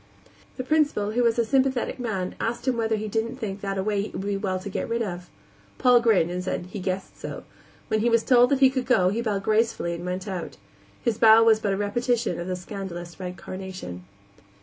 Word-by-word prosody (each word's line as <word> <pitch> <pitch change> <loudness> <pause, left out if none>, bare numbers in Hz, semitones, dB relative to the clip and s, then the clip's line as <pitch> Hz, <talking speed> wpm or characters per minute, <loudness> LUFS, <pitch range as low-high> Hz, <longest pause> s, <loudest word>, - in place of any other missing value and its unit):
The 255 - -3
Principal, 285 -8 +1
who 240 +3 +1
was 235 -1 +2
a 235 - +2
sympathetic 265 +1 +1
man, 195 -7 -2
asked 235 +2 -3
him 255 - +2
whether 225 -1 0
he 215 0 -3
didn't 225 +3 -2
think 205 -5 -5
that 195 -1 -3
a 190 - 0
way 205 -1 0
it - - -9
would 190 - -4
be 205 0 -1
well 195 -2 -1
to 185 - -7
get 200 - -3
rid 230 0 0
of. 180 -3 -6 0.5
Paul 250 -2 +5
grinned 205 -8 +3
and 180 +1 -3
said 180 -1 -3
he 210 - -5
guessed 185 +1 -4
so. - - -6 0.4
When 215 - +1
he 235 +2 +2
was 230 -1 +3
told 245 -1 +5
that 280 -1 +1
he 265 -1 +7
could 260 -2 -2
go 185 -8 +4
he 220 +5 -1
bowed 205 -4 -1
gracefully 215 -5 +1
and 170 0 -6
went 180 +2 -4
out. 185 -4 -5 0.5
His 230 -3 0
bow 225 0 +8
was 225 -1 +5
but 200 -2 0
a - - -1
repetition 225 -1 0
of 175 - -5
the 185 - -1
scandalous 180 -2 -7
red 180 -1 -6
carnation. 185 - -7
210 Hz, 230 wpm, -25 LUFS, 185-235 Hz, 0.5 s, bow